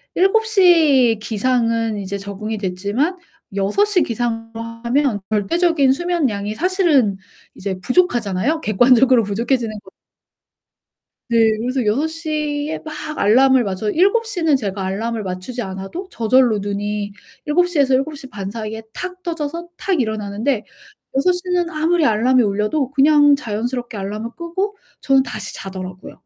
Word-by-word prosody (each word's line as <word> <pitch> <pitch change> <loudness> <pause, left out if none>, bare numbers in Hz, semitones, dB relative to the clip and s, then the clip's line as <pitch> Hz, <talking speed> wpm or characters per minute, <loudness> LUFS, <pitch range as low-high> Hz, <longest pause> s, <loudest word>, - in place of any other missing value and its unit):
7:00 355 - +4
기상은 230 -1 0
이제 200 +1 -4
적응이 200 +2 -5
됐지만 205 - -1 0.4
6:00 365 - +2
기상으로 225 -1 -3 0.2
하면 255 -3 +1
절대적인 285 - +2
수면량이 270 - -1
사실은 320 - +2 0.4
이제 190 -1 -4
부족하잖아요. 250 - +1
객관적으로 245 +3 +4
부족해지는 225 +2 -1
거 - - -17 1.4
네. 235 -1 +1 0.2
그래서 250 +1 -1
6:00 300 +3 -1
에 - - -3
막 310 -1 -7 0.2
알람을 260 +4 +4
맞춰 200 +1 -2
7:00 400 - +1
는 315 -4 +3
제가 200 -5 -3
알람을 220 +4 -2
맞추지 185 +7 -5
않아도 195 - -6
저절로 235 - +3
눈이 205 0 -3 0.3
7:00 350 +2 +1
에서 270 -2 +3
7:30사이에 225 -6 -4
탁 365 0 -6
떠져서 335 0 -4
탁 375 -6 0
일어나는데 220 +2 -2 0.5
6:00 360 +6 +2
는 350 -1 +1
아무리 320 0 +1
알람이 245 +3 +3
울려도 210 +6 0
그냥 290 +1 +5
자연스럽게 240 -1 -4
알람을 210 +4 -5
끄고 375 +5 -3 0.3
저는 270 -1 +4
다시 - - -6
자더라고요. 185 -1 -8
245 Hz, 275 characters per minute, -19 LUFS, 210-315 Hz, 1.4 s, 그냥